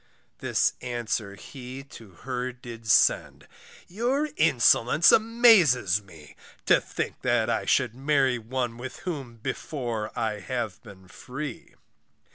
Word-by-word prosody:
This - - +1
answer 115 -4 -3
he 130 +5 -9
to 110 -3 -12 0.2
her 125 -1 -3
did 120 -2 -11
send, - - +3 0.4
Your 250 - -1
insolence 150 0 +4
amazes 210 - +4
me, 80 -7 -16 0.3
To - - +4
think - - -5
that - - +1
I - - -1
should 125 -3 +2
marry 135 -1 +1
one 120 +1 -3
With 130 +5 -8
whom, 140 -9 -5
before, 115 -1 -4
I 110 -2 -2
have 115 -1 -4
been 100 -6 -15
free. 130 +6 -8
125 Hz, 120 wpm, -26 LUFS, 115-145 Hz, 0.4 s, insolence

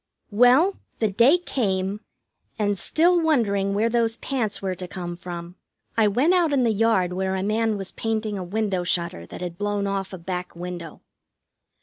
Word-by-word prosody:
Well, 250 - +5 0.2
the 220 -3 0
day 240 - +5
came, 200 - -1 0.6
and, 205 -2 +1
still 340 - +3
wondering 200 -11 +1
where 215 +3 +2
those 230 -1 +1
pants 230 -7 -2
were 190 -1 -2
to 180 0 -7
come 175 -1 -6
from, 175 0 -8 0.4
I 220 -1 +4
went 255 - +3
out 345 -4 +3
in 275 -3 +2
the 230 -2 +2
yard 200 -4 +2
where 190 +1 -1
a 190 - -2
man 220 +1 +1
was 195 -1 -4
painting 220 -2 -2
a 190 - -4
window 195 -1 -1
shutter 170 - -1
that - - -9
had 175 0 -5
blown 205 -1 -1
off 195 -1 -2
a 190 - -6
back 180 +1 -5
window. 175 -2 -7
205 Hz, 180 wpm, -24 LUFS, 185-230 Hz, 0.6 s, Well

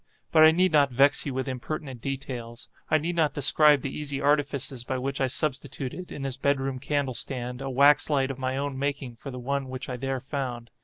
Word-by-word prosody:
But 160 - +5
I 155 - +9
need 180 +3 +3
not 145 -2 +4
vex 140 +4 +4
you 140 - -3
with 130 +1 -2
impertinent 130 0 -5
details. 125 -3 -5 0.2
I 155 - +4
need 165 +3 -3
not 155 -4 +1
describe 145 0 +5
the 135 - -5
easy 145 -2 -3
artifices 140 -3 0
by 130 +1 -3
which 135 +2 -3
I 135 - +3
substituted, 145 +4 -3
in 140 - -6
his 135 -1 -3
bed 140 +1 +1
room 135 -1 -3
candle 140 -1 -1
stand, 125 0 -4
a 135 - -4
wax 140 +4 +4
light 135 -2 +1
of 135 - -8
my 130 0 -2
own 140 -1 -3
making 140 -4 -3
for 140 - -8
the 125 - -7
one 135 +2 -3
which 130 +1 -6
I 125 - -4
there 135 +1 -2
found. 125 -3 -5
135 Hz, 220 wpm, -26 LUFS, 130-145 Hz, 0.2 s, I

